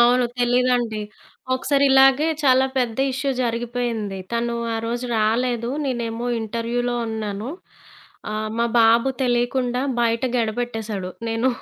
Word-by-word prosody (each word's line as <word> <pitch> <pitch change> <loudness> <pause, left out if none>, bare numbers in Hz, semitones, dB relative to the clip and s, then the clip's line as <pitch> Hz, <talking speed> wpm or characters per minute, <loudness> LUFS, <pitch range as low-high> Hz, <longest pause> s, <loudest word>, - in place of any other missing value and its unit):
అవును 245 +1 +5
తెలీదండి. 245 -2 +2 0.5
ఒకసారి 280 +2 +1
ఇలాగే 270 +2 +6 0.2
చాలా 260 -1 +5
పెద్ద 240 -4 0 0.2
ఇష్యూ 260 +2 -1
జరిగిపోయింది. 235 -4 -2
తను 235 0 0 0.2
ఆ - - 0
రోజు 240 +2 -3
రాలేదు. 235 +2 +1
నేనేమో 235 -3 -2
ఇంటర్వ్యూలో 235 +2 -2
ఉన్నాను. 215 0 -4 0.8
ఆహ్, 215 0 -3
మా 235 - +2
బాబు 230 +3 +5
తెలియకుండా 245 0 0 0.2
బయట 230 -1 +1
గడె 225 -3 0
పెట్టేశాడు. 220 -6 -4 0.2
నేను 225 +3 +1
240 Hz, 120 wpm, -22 LUFS, 225-250 Hz, 0.8 s, ఇలాగే